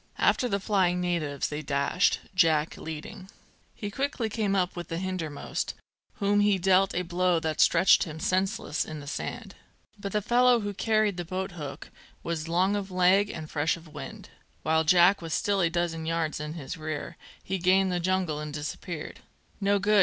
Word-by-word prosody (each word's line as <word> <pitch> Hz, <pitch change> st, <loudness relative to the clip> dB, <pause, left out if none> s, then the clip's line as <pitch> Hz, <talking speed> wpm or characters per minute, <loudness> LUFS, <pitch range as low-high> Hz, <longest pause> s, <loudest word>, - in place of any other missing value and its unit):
After 250 Hz, -, +2 dB
the 200 Hz, -, 0 dB
flying 190 Hz, -3 st, +1 dB
natives 165 Hz, -6 st, -1 dB
they 150 Hz, 0 st, -4 dB
dashed, 140 Hz, +5 st, +1 dB
Jack 160 Hz, -3 st, +3 dB
leading. 185 Hz, +5 st, -8 dB, 0.5 s
He 205 Hz, -1 st, -5 dB
quickly 265 Hz, -2 st, -2 dB
came 210 Hz, -2 st, 0 dB
up 185 Hz, -2 st, 0 dB
with 175 Hz, -2 st, -6 dB
the 165 Hz, -, -4 dB
hinder 185 Hz, -3 st, -3 dB
most, 145 Hz, -, -4 dB, 0.4 s
whom 205 Hz, 0 st, +1 dB
he 205 Hz, -1 st, +4 dB
dealt 190 Hz, +1 st, +3 dB
a 180 Hz, -, 0 dB
blow 180 Hz, 0 st, +1 dB
that 160 Hz, -1 st, 0 dB
stretched 175 Hz, +3 st, +5 dB
him 160 Hz, -2 st, -7 dB
senseless 185 Hz, -2 st, 0 dB
in 155 Hz, -1 st, -7 dB
the 145 Hz, -, -9 dB
sand. 145 Hz, -, -5 dB, 0.5 s
But 200 Hz, 0 st, -5 dB
the 210 Hz, -, +2 dB
fellow 245 Hz, +1 st, +4 dB
who 205 Hz, 0 st, -3 dB
carried 215 Hz, -1 st, +1 dB
the 175 Hz, -, -2 dB
boathook 175 Hz, -5 st, -6 dB, 0.3 s
was 165 Hz, -1 st, -3 dB
long 185 Hz, +4 st, +2 dB
of 200 Hz, -1 st, -3 dB
leg 185 Hz, +2 st, +4 dB
and 155 Hz, -5 st, -6 dB
fresh 155 Hz, +2 st, 0 dB
of 165 Hz, -1 st, -14 dB
wind; -, -, -9 dB, 0.3 s
while 160 Hz, 0 st, +2 dB
Jack 175 Hz, +3 st, +5 dB
was 165 Hz, -1 st, -2 dB
still 200 Hz, -1 st, +1 dB
a 170 Hz, -, +3 dB
dozen 165 Hz, -1 st, -2 dB
yards 165 Hz, -2 st, -1 dB
in 150 Hz, 0 st, -5 dB
his 165 Hz, +1 st, -6 dB
rear, 155 Hz, +1 st, -5 dB, 0.3 s
he 190 Hz, 0 st, -2 dB
gained 185 Hz, +2 st, +3 dB
the 180 Hz, -, 0 dB
jungle 180 Hz, -4 st, 0 dB
and 150 Hz, 0 st, -5 dB
disappeared. 150 Hz, +2 st, -6 dB, 0.4 s
"No 200 Hz, 0 st, +2 dB
good!" 210 Hz, +2 st, +3 dB
180 Hz, 185 wpm, -28 LUFS, 160-195 Hz, 0.5 s, stretched